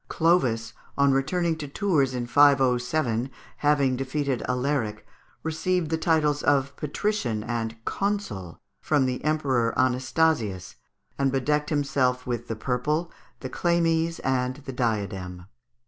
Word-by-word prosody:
Clovis 125 -10 +1 0.2
on 140 0 +4
returning 160 +5 +1
to 150 -2 -6
Tours 140 -5 +1
in 120 -1 -2
507, 130 -2 +3
after 130 - -23 0.2
having 140 -3 +2
defeated 135 0 -2
Alaric, 125 -4 -1 0.4
received 160 +1 -1
the 160 - +1
titles 150 -3 +2
of 140 -1 +1
Patrician 145 - -2
and 115 -1 -3
Consul 195 - -3 0.2
from 145 -3 +2
the 125 -1 -2
Emperor 135 -6 +1
Anastasius, 125 - +1 0.5
and 135 -1 +2
bedecked 150 +3 0
himself 135 -4 0
with 120 -1 -3
the 115 - -3
purple, 150 +9 -1 0.3
the 130 - -5
chlamys, 165 0 +1
and 130 +1 -1
the 135 - -5
diadem. 100 -7 -2
135 Hz, 125 wpm, -26 LUFS, 120-155 Hz, 0.5 s, on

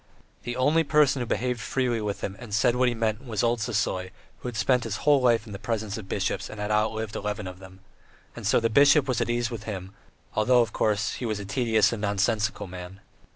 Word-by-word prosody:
The 120 - -3
only 145 +6 +3
person 145 -2 +3
who 120 - -3
behaved 125 +1 -1
freely 125 -3 -1
with 105 -1 -3
him 95 - -4
and 115 -5 -5
said 120 +2 +3
what 125 0 +3
he 120 - -3
meant 110 +1 -1
was 115 -5 -2
old 120 0 +2
Sisoy, 105 -4 -1 0.3
who - - -7
had 120 - -5
spent 125 +3 +2
his 115 -3 -3
whole 145 -2 +5
life 120 -3 +3
in 105 - -9
the 100 - -6
presence 110 -1 -3
of 105 -4 -8
bishops 100 0 -2
and 110 - -9
had 105 +1 -2
outlived 110 0 0
eleven 105 0 -3
of 90 0 -8
them. 95 0 -14 0.5
And - - -4
so - - +4
the 115 - +1
bishop 140 +4 +5
was 130 -2 0
at - - -1
ease 120 0 0
with 110 -2 -6
him, 95 -3 -6 0.4
although, 120 +3 +4
of 115 -2 -1
course, 105 -1 0
he 125 - -5
was 110 -2 -2
a 100 - -6
tedious 110 0 +2
and 110 - -4
nonsensical 105 +2 0
man. 90 +1 -9
110 Hz, 235 wpm, -26 LUFS, 105-120 Hz, 0.5 s, whole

